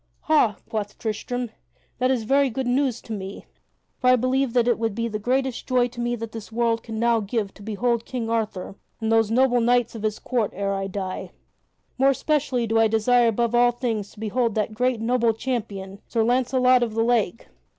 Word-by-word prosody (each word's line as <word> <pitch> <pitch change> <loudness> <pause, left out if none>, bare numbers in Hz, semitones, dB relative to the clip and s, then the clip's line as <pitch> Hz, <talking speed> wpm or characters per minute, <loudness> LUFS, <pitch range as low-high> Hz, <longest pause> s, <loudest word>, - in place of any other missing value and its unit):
"Ha," 290 -9 +3
quoth 210 -2 -4
Tristram, 240 +2 -3 0.5
"that 255 0 +2
is 255 -4 +1
very 275 +4 +3
good 260 +2 -3
news 250 -1 0
to 225 - -6
me, 195 -1 -7 0.5
for 250 - +3
I 255 - +7
believe 255 +1 0
that 240 -1 +3
it 240 - +2
would 225 -3 -1
be 230 +1 -1
the 215 -2 -4
greatest 260 +3 -1
joy 250 -1 +2
to 240 0 -12
me 240 0 0
that 230 -1 -6
the 225 -2 -8
world 230 0 +1
can 225 -1 -7
now 235 0 +3
give 210 -1 -2
to - - -16
behold 225 +3 -1
King 240 -2 -4
Arthur 220 -5 -2 0.3
and 220 0 -1
those 225 -1 +3
noble 245 +1 +3
knights 240 0 +2
of 225 - -7
his 215 0 -1
court 235 -5 -1
ere 200 +1 -1
I 195 0 -2
die. 190 -1 -5 0.7
More 270 +1 +5
especially 275 -3 0
do 225 0 +1
I 225 - +5
desire 235 +2 +3
above 235 +1 +1
all 240 0 +5
things 230 -4 -3
to - - -16
behold 225 +1 0
that 215 0 -1
great, 250 +1 0
noble 235 0 +2
champion, 205 -6 -4
Sir 230 -2 +1
Launcelot 255 +1 +3
of 225 -2 -1
the 225 - +2
Lake. 230 -3 0
230 Hz, 205 wpm, -24 LUFS, 220-250 Hz, 0.7 s, I